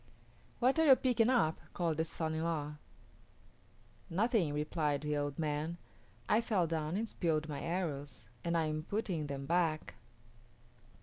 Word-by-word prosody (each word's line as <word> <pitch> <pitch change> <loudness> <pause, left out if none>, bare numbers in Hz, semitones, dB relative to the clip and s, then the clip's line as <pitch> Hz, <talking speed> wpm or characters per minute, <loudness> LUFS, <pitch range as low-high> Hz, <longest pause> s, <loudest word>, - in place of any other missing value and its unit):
"What 260 +6 +3
are 320 - +5
you 265 - +10
picking 245 -3 +2
up?" 195 -12 +3 0.2
called 165 -3 0
the 160 - +1
son 160 0 -3
in 160 0 -1
law. 150 -3 -2 1.3
"Nothing," 200 -2 +2
replied 150 -1 0
the 150 0 -1
old 145 -1 -2
man. 155 +2 -1 0.5
"I 215 - +4
fell 200 -7 +1
down 160 +1 -1
and 225 +2 -1
spilled 160 -6 0
my 150 -2 -4
arrows, 145 -9 -3 0.2
and 170 0 +1
I 165 - +2
am 155 0 -1
putting 175 -4 -2
them 140 -1 -4
back." 165 -1 +1
160 Hz, 150 wpm, -34 LUFS, 150-180 Hz, 1.3 s, you